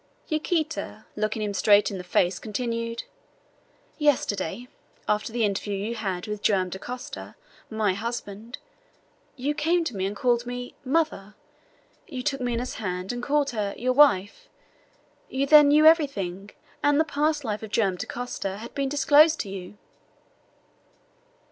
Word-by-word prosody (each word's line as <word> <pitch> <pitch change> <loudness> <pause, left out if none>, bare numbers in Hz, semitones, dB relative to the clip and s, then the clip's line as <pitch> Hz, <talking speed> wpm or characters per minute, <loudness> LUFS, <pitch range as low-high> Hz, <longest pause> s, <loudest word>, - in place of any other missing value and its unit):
Yaquita, 310 -7 -2
looking 215 +1 -1
him 205 -1 -2
straight 205 +1 +4
in 195 - -5
the - - -6
face, 180 0 +1
continued: 230 +1 -3 1.0
"Yesterday, 245 - 0 0.4
after 210 +2 0
the 235 -1 +1
interview 205 0 -2
you 205 +4 -3
had 190 -6 -3
with 210 -1 -5
Joam 190 -4 +2
Dacosta, 245 +7 -7 0.3
my 215 -3 +1
husband, 225 +1 -5 0.8
you 280 +2 -1
came 330 +3 +1
to 250 -9 -4
me 190 0 -1
and 200 - -5
called 240 0 +1
me 245 0 -5
mother! 265 -8 -1 0.7
You 255 -5 -6
took 275 0 -1
Minha's 245 0 -2
hand, 180 -1 -3
and 245 - -4
called 285 +2 +1
her 210 -4 -2
your 255 +1 0
wife! 275 - +4 0.8
You 270 +1 0
then 295 0 +8
knew 300 +2 +5
everything, 205 - +3 0.3
and 290 0 +3
the - - +5
past 300 0 0
life 215 -3 -3
of 220 - -7
Joam 200 -4 +1
Dacosta 200 -4 -4
had 230 +3 -9
been 275 -2 -1
disclosed 295 +3 +5
to 200 - -7
you." 190 +1 -8
235 Hz, 145 wpm, -26 LUFS, 205-285 Hz, 1.0 s, then